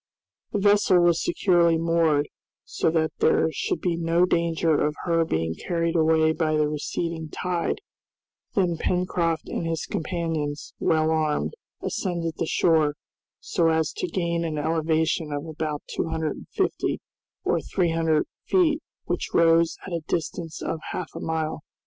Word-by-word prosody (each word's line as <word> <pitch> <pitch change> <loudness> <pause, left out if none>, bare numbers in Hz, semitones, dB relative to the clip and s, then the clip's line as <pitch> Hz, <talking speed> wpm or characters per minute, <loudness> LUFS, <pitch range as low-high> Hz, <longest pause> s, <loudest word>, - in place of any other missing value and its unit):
The - - 0
vessel 205 -2 +4
was 175 -1 +3
securely 170 -3 +3
moored, 165 -3 +2 0.4
so - - 0
that 160 -1 +1
there 160 - +3
should - - -2
be 175 -2 0
no 170 +1 +3
danger 165 -2 +1
of 150 0 0
her 165 -2 +3
being 80 - -1
carried 170 - -1
away 160 -1 +4
by 155 -1 0
the 150 -1 +3
receding 160 +2 -3
tide; 180 - -2 0.7
then 180 -4 +2
Pencroft 170 -2 0
and - - -3
his 165 -1 -2
companions, 160 -4 -3
well 160 0 +2
armed, 155 -2 0 0.3
ascended 170 -4 -2
the 165 - 0
shore, 155 -4 +3 0.4
so 170 - +1
as 160 -1 +1
to - - -1
gain 170 -1 -1
an 160 -2 -2
elevation 160 0 0
of 145 +1 -3
about 155 -2 -4
two - - -2
hundred 160 -2 -1
and - - -12
fifty - - -1 0.4
or - - +1
three 175 -3 0
hundred 160 -2 +2 0.2
feet 320 -5 +3 0.2
which - - -2
rose 165 0 +4
at 185 - -6
a 170 - -1
distance 165 0 -3
of 160 - -2
half 180 - -4
a - - -6
mile. 160 -1 -2
165 Hz, 155 wpm, -25 LUFS, 155-170 Hz, 0.7 s, vessel